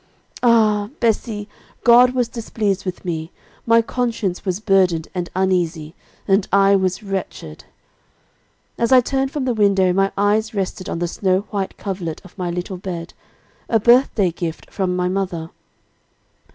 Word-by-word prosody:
Ah! 215 Hz, -4 st, +3 dB
Bessie, 220 Hz, -2 st, -1 dB, 0.4 s
God 245 Hz, +2 st, +6 dB
was 245 Hz, -2 st, +1 dB
displeased 215 Hz, -5 st, -2 dB
with 185 Hz, -1 st, -5 dB
me, 165 Hz, -1 st, -4 dB, 0.4 s
my 230 Hz, 0 st, +5 dB
conscience 225 Hz, -7 st, -2 dB
was 185 Hz, -1 st, -2 dB
burdened 185 Hz, -6 st, +2 dB
and 180 Hz, -2 st, -3 dB
uneasy, 175 Hz, -4 st, 0 dB, 0.3 s
and 195 Hz, 0 st, +2 dB
I 200 Hz, 0 st, +5 dB
was 190 Hz, +1 st, 0 dB
wretched. 190 Hz, -, -6 dB, 1.1 s
"As 235 Hz, +1 st, +1 dB
I 260 Hz, -, +8 dB
turned 270 Hz, +2 st, -1 dB
from 280 Hz, -1 st, -3 dB
the 250 Hz, -, +1 dB
window, 195 Hz, -4 st, +3 dB
my 195 Hz, +1 st, +2 dB
eyes 215 Hz, +2 st, +1 dB
rested 190 Hz, -1 st, -3 dB
on -, -, -3 dB
the 175 Hz, +1 st, -1 dB
snow 185 Hz, +2 st, 0 dB
white 200 Hz, -2 st, -3 dB
coverlet 180 Hz, -5 st, -4 dB
of 185 Hz, -, -15 dB
my 180 Hz, -2 st, -3 dB
little 180 Hz, +2 st, -4 dB
bed, 175 Hz, -3 st, -6 dB, 0.6 s
a 225 Hz, -, +3 dB
birthday 235 Hz, -5 st, +4 dB
gift 165 Hz, -1 st, -6 dB
from 185 Hz, -2 st, -1 dB
my 180 Hz, 0 st, 0 dB
mother. 180 Hz, -4 st, -3 dB
195 Hz, 150 wpm, -20 LUFS, 180-220 Hz, 1.1 s, I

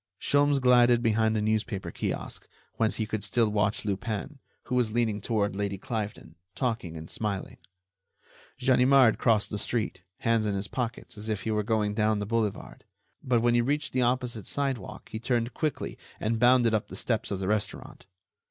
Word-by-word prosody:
Sholmes 145 Hz, 0 st, +3 dB
glided 120 Hz, -2 st, +5 dB
behind 110 Hz, -1 st, +2 dB
a 105 Hz, -, 0 dB
newspaper 110 Hz, -2 st, -1 dB
kiosk, -, -, -4 dB, 0.3 s
whence 110 Hz, -1 st, +2 dB
he 110 Hz, -, -1 dB
could 110 Hz, -1 st, -4 dB
still 105 Hz, +2 st, +2 dB
watch 105 Hz, 0 st, 0 dB
Lupin, 110 Hz, +7 st, -3 dB, 0.2 s
who 125 Hz, -, -6 dB
was 125 Hz, -3 st, +2 dB
leaning 110 Hz, -3 st, 0 dB
toward 105 Hz, -3 st, 0 dB
Lady 100 Hz, -1 st, -2 dB
Cliveden, 105 Hz, -5 st, -5 dB, 0.2 s
talking 110 Hz, -, -2 dB
and 80 Hz, 0 st, -8 dB
smiling. 100 Hz, -2 st, -3 dB, 1.0 s
Ganimard 130 Hz, -1 st, +5 dB
crossed 110 Hz, -4 st, +2 dB
the 105 Hz, -, -2 dB
street, 115 Hz, 0 st, -1 dB, 0.2 s
hands 115 Hz, -2 st, +2 dB
in 100 Hz, -, 0 dB
his 100 Hz, 0 st, -2 dB
pockets, 115 Hz, -2 st, -4 dB
as 110 Hz, +2 st, -5 dB
if 105 Hz, -2 st, -2 dB
he 110 Hz, -, -1 dB
were 105 Hz, 0 st, +1 dB
going 105 Hz, -1 st, 0 dB
down 110 Hz, 0 st, +2 dB
the 105 Hz, -, -2 dB
boulevard, 105 Hz, -2 st, -2 dB, 0.4 s
but 120 Hz, -3 st, +2 dB
when 120 Hz, 0 st, +4 dB
he 120 Hz, -, +4 dB
reached 145 Hz, +4 st, -1 dB
the 130 Hz, -, +2 dB
opposite 120 Hz, -4 st, -1 dB
sidewalk 135 Hz, -7 st, -3 dB
he 110 Hz, -, -5 dB
turned 120 Hz, 0 st, -1 dB
quickly 155 Hz, +1 st, -3 dB, 0.2 s
and 110 Hz, +1 st, -1 dB
bounded 120 Hz, -1 st, +5 dB
up 110 Hz, +1 st, 0 dB
the -, -, -9 dB
steps 115 Hz, -3 st, -1 dB
of 100 Hz, -, -2 dB
the 95 Hz, -, -3 dB
restaurant. 105 Hz, -2 st, -3 dB
110 Hz, 180 wpm, -28 LUFS, 105-120 Hz, 1.0 s, glided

